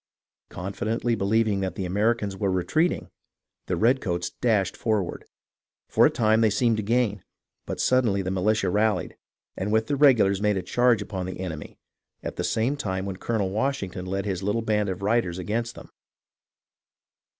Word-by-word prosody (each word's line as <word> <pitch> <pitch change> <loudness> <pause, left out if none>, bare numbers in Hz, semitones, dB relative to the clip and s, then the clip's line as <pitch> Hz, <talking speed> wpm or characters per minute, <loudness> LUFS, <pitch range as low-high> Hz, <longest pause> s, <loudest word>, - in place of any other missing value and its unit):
Confidently 110 +5 -2
believing 105 0 +1
the 95 -1 -1 0.2
Ameri 105 +6 +2
cans 100 -3 -4
were 100 0 -1
retreating, 155 - 0 0.6
the - - 0
redcoats 110 -8 +1
dashed 105 -6 0
forward. 105 -6 -1 0.6
For - - +5
a - - +2
time 110 0 +2
they 110 - +4
seemed 115 +2 +2
to - - 0
gain, 110 -2 0 0.4
but - - -4
suddenly 115 -7 +2
the 95 - -2
militia 100 +1 +1
rallied 105 -1 +1 0.4
and 100 +2 -3
with 110 +1 +2
the 145 - -1
regulars 115 -9 +4
made 105 -1 +2
a 95 - -2
charge 120 -2 +2
upon 95 -3 -5
the 95 - -6
enemy, 80 -5 -6 0.5
at - - -5
the - - -3
same 120 +6 0
time 95 -6 -3
when 95 -2 -4
Colonel 100 -3 -1
Washington 100 -6 -2
led 95 +2 -2
his 95 -3 -2
little 105 +4 -1
band 105 -2 +1
of 95 +1 -4
riders 105 -5 +1
against 115 +6 -3
them. - - -12
105 Hz, 165 wpm, -25 LUFS, 95-115 Hz, 0.6 s, For